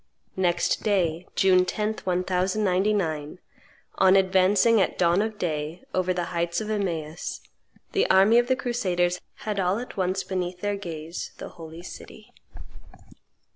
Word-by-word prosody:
Next 175 -2 +1
day, 180 -5 0
June 185 -1 +5
10th 210 +4 -2
1099, 185 -3 0 0.6
on 190 0 +6
advancing, 195 +3 +4
at - - 0
dawn 175 +2 +3
of 215 0 -3
day, 155 -1 -3
over 185 0 +1
the 180 -1 -1
heights 170 0 0
of 215 0 -4
Emmaus, 170 -6 -3 0.5
the 395 - +1
army 195 +5 +6
of 240 - +1
the 260 - +3
crusaders 185 -9 -1 0.2
had, 210 -2 -1
all 185 +1 +1
at 245 -2 -7
once, 190 0 0
beneath 180 -1 -3
their 205 0 -1
gaze 165 -3 -6
the - - -7
Holy 165 0 -11
City. - - -11
185 Hz, 135 wpm, -25 LUFS, 175-205 Hz, 0.6 s, on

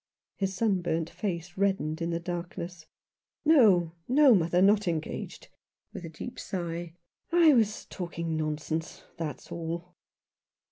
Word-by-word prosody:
His 195 -1 -2
sunburnt 180 -6 0
face 175 -4 -4
reddened 190 -5 0
in 165 - -1
the 170 0 -1
darkness. 170 -1 -6 0.3
" - - -15
Xo, 205 - +6 0.2
no. 275 0 +7
mother, 175 -2 +3
not 205 +1 +4
engaged! 160 -2 -4 0.2
" - - -50
with - - -7
a 165 - -6
deep 245 +11 -8
sigh. 170 -2 -4 0.2
" - - -46
I 335 -3 +7
was 220 -4 +2
talking 170 -3 -4
nonsense, 155 +1 -3
that's 155 -5 -5
all." 170 +1 -5
175 Hz, 140 wpm, -29 LUFS, 165-200 Hz, 0.3 s, no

